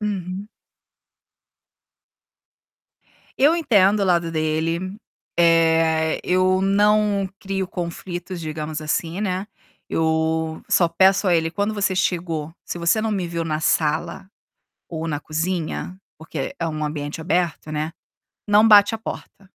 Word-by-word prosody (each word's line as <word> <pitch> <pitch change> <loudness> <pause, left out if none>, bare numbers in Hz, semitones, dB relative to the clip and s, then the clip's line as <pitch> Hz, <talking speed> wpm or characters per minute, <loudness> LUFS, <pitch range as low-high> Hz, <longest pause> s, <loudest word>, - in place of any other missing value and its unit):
Uhum. 195 -1 -4 2.9
Eu 295 +5 +5
entendo 210 - +3
o - - +2
lado 170 -3 +1
dele, 165 +4 -1 0.4
eh, 165 -1 +3
eu 185 +1 +2
não 205 0 +2
crio 195 -2 -3
conflitos, 175 0 -6
digamos, 155 -1 -4
assim, 165 +4 -2
né, 190 -1 -2 0.4
eu 160 0 0
só 170 - +4
peço 190 +3 +3
a 175 - +4
ele: 165 0 +1
"Quando 205 +5 -1
você 195 -2 0
chegou, 165 -4 -2
se - - -5
você 170 +6 +2
não 220 0 -1
me 195 -4 -1
viu 170 0 -3
na 155 -1 -2
sala 160 +4 0 0.6
ou 165 -1 -4
na 150 -2 -2
cozinha 165 +3 -3 0.2
porque 155 -3 -6
é 165 - -1
um 155 -1 -3
ambiente 150 0 -4
aberto, 165 -1 -1
né, 155 +1 -2 0.6
não 210 +2 +5
bate 205 -1 +7
a - - -7
porta". 205 -2 -8
170 Hz, 130 wpm, -22 LUFS, 160-195 Hz, 2.9 s, bate